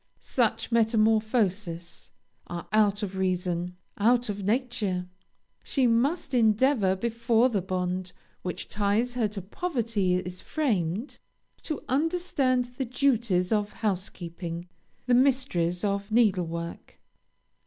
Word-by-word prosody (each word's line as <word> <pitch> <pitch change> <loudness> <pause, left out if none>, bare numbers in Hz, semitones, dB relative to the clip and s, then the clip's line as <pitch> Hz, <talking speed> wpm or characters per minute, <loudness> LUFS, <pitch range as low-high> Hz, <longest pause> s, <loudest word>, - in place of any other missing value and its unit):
Such - - 0
metamorphoses 215 -6 +1 0.4
are 175 -1 -6
out 210 -1 +3
of 195 -2 -4
reason 180 -1 -1 0.2
out 240 +2 +3
of 200 -1 -3
nature. 210 -5 -1 0.6
She 270 -3 +1
must 270 +6 +1
endeavor 220 -3 +3
before 235 +3 +2
the 205 -6 0
bond 180 0 -2 0.3
which 180 - -5
ties 210 +4 +1
her 240 -3 +1
to 200 -2 -6
poverty 225 - -1
is 180 0 -3
framed, 220 - -1 0.4
to 310 - -4
understand 280 -4 +1
the 250 +2 -5
duties 235 -8 +1
of 210 -1 +1
housekeeping, 175 -4 -4 0.4
the 250 - +2
mysteries 245 -10 +2
of 200 0 -1
needle 205 -7 +3
work. 170 +1 -7
210 Hz, 110 wpm, -27 LUFS, 185-245 Hz, 0.6 s, out